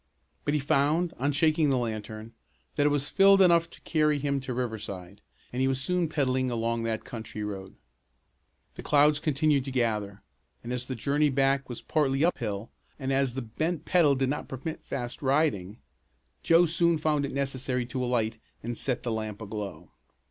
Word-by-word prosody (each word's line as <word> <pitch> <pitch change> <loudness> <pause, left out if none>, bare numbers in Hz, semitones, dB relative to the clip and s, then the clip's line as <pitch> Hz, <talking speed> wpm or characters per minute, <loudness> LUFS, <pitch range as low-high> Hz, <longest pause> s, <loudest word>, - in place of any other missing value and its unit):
But 145 - +1
he - - +2
found, 155 +4 +1
on 140 +3 +1
shaking 155 +1 +3
the 135 - +2
lantern, 110 -1 -4 0.4
that 145 0 +3
it - - +4
was 145 0 0
filled 195 0 +6
enough 170 -3 +5
to - - -13
carry 150 -2 +2
him 140 0 -1
to 130 - -5
Riverside, 105 -5 -5 0.3
and 125 - -1
he 130 - +3
was 135 -1 0
soon 175 +3 0
pedaling 130 -4 0
along 115 -1 -1
that 110 -1 -2
country 110 -3 -6
road. 95 -2 -6 1.0
The - - -8
clouds 150 +1 +4
continued 150 -2 +2
to 135 - -4
gather, 105 -5 -1 0.5
and 120 +1 -4
as 125 0 -4
the 130 - -3
journey 145 +5 +1
back 135 0 +1
was 120 - -6
partly 145 -1 +1
up 175 - 0
hill, 105 -1 -4 0.3
and 135 -1 -2
as 135 -2 +1
the 135 - -3
bent 155 +9 -3
pedal 160 -6 +4
did 135 0 0
not 150 - -3
permit 135 +5 -5
of - - -36
fast 120 -3 -5
riding, 130 - +1 0.6
Joe 170 +1 +5
soon 170 0 +2
found 150 -2 +1
it 140 - -3
necessary 130 -2 -1
to 125 +1 -3
alight 115 -3 0 0.2
and 120 +1 -3
set 125 +1 0
the 120 - -2
lamp 110 -2 -4
aglow. 105 -2 -7
135 Hz, 185 wpm, -28 LUFS, 115-150 Hz, 1.0 s, filled